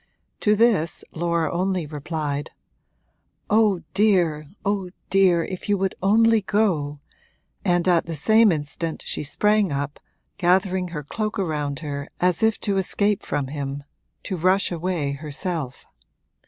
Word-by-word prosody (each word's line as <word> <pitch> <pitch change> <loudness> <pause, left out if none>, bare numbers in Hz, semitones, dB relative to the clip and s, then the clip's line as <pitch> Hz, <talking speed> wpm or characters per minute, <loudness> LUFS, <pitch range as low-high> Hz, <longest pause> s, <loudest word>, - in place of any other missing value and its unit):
To 210 0 +3
this 205 -8 +2
Laura 170 0 0
only 185 -1 0
replied: 150 -1 -4 1.0
'Oh 210 -4 +3
dear, 175 -7 +2 0.2
oh 195 -2 -1 0.2
dear, 185 -3 +4
if 185 +2 -6
you 205 - +3
would 190 0 0
only 225 +3 +4
go!' 180 -9 0 0.6
and 175 -2 +2
at 175 -2 +3
the 165 - -3
same 220 +7 +5
instant 155 +1 -3
she - - -3
sprang 210 +5 +2
up, 140 +1 -3 0.4
gathering 185 0 +2
her 155 -4 -6
cloak 215 +8 -3
around 150 -6 -2
her 140 -2 -5
as 180 -2 +1
if 220 -1 +2
to 200 -1 0
escape 200 +2 +1
from 135 -2 -3
him, 140 -1 -4 0.4
to 190 - -3
rush 185 +4 +2
away 170 -4 -1
herself. 150 -1 -5
175 Hz, 135 wpm, -23 LUFS, 150-200 Hz, 1.0 s, same